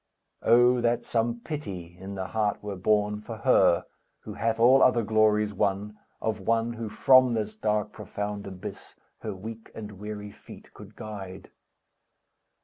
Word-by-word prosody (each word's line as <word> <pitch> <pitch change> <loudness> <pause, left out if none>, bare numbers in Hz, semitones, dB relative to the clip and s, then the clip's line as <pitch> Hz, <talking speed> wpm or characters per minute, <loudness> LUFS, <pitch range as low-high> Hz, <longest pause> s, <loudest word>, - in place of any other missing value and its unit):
Oh 120 +2 +5
that 120 0 +1
some 115 0 0
pity 95 - -6
in 95 +1 -7
the 95 -1 -3
heart 105 -2 -1
were 105 -1 -4
born, 105 +2 +1
For 110 +1 -7
her, 95 -8 +4 0.4
who 105 - -8
hath 115 +2 -1
all 130 +3 +6
other 120 -2 +4
glories 105 -1 +2
won, 100 +1 -1 0.2
Of 110 -1 -2
one, 115 +3 0
who 115 -1 -5
from 130 0 +5
this 110 -1 -3
dark, 105 -1 -1
profound 105 0 -5
abyss, 95 -2 -9 0.2
Her 105 -3 -5
weak 110 +4 -9
and 105 -3 -8
weary 105 0 -6
feet - - -14
could - - -13
guide! 95 -3 -8
105 Hz, 150 wpm, -27 LUFS, 100-115 Hz, 0.4 s, all